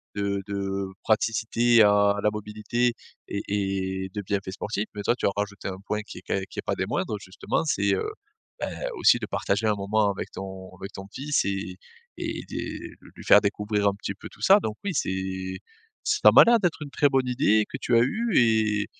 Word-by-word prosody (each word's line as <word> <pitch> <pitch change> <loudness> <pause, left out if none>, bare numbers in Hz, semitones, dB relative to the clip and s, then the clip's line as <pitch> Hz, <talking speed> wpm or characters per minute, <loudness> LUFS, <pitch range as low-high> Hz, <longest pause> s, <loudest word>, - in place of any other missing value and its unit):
de 100 -1 -1
de 100 -1 -2 0.2
praticité 115 +2 +3
à 100 -1 +5
la 105 - +4
mobilité 105 +3 -1 0.3
et 100 - -3
et 95 -1 -2
de 105 - -3
bienfaits 100 -1 -3
sportifs. 105 +2 -3
Mais 105 - -5
toi 120 - +2
tu - - -3
as - - +3
rajouté 100 0 -4
un 95 -1 -5
point 105 0 -1
qui 105 - -10
est - - -16
quand - - 0
qui - - -7
est - - -1
pas - - 0
des - - -1
moindres 105 - -2
justement 100 - -3
c'est, 160 - +2
heu, 445 - -2 0.7
beh - - -8 0.2
aussi 350 - +5
de 110 - -5
partager 105 +1 -1
un 105 - +3
moment 100 +1 +1
avec 95 - -6
ton 95 -1 -8
avec 95 +2 -8
ton 95 - -8
fils 145 +2 0
et 95 -1 -3 0.4
et - - -4
de - - -6 0.2
lui - - -11
faire 105 - +7
découvrir 105 0 0
un 100 - 0
petit 100 0 -5
peu 100 - -10
tout - - -18
ça. 200 +2 +7
Donc 110 - -4
oui 200 - -1
c'est 95 -2 -2 0.5
ça - - +5
m'a - - +9
l'air 235 -1 +5
d'être 175 -5 0
une 145 - -7
très 145 - +3
bonne 135 -2 +1
idée 110 -4 +3
que - - -5
tu 120 - +2
as 115 - +6
eue 220 - -1
et 110 -3 +3
105 Hz, 210 wpm, -26 LUFS, 100-115 Hz, 0.7 s, m'a